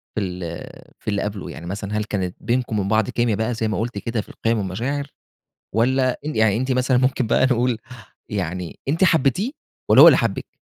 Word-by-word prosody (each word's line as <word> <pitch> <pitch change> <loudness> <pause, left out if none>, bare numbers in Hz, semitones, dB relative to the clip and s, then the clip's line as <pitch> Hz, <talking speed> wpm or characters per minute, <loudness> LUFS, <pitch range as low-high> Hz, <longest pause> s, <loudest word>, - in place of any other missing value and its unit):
في 110 - 0
ال 90 -3 -5 0.4
في - - -28
اللي 100 -1 0
قبْله، 105 -2 -4
يعني 85 - -9
مثلًا 100 +3 -4
هل 105 - 0
كانت 95 -4 -3
بينكم 120 -3 0
وبين 100 0 -1
بعض 110 -1 +2
كيميا 120 -3 +1
بقى 110 +3 -1
زي 110 -1 -1
ما 105 - -1
قلتِ 115 -1 -3
كده 115 +2 -2
في - - -16
القِيَم 115 0 -1
والمشاعر 120 +9 -2 0.7
والّا 130 +3 +2
أن 155 - -3
يعني 110 -2 +3
أنتِ 130 +3 0
مثلًا، 130 0 +2
ممكن 130 -1 +1
بقى 130 - +3
نقول، 125 -2 +1 0.5
يعني 90 -3 -4
أنتِ 160 +7 +2
حبّيتيه 165 - +2 0.4
والّا - - +8
هو - - +11
اللي - - +6
حبِّك؟ - - -3
110 Hz, 200 wpm, -22 LUFS, 100-130 Hz, 0.7 s, هو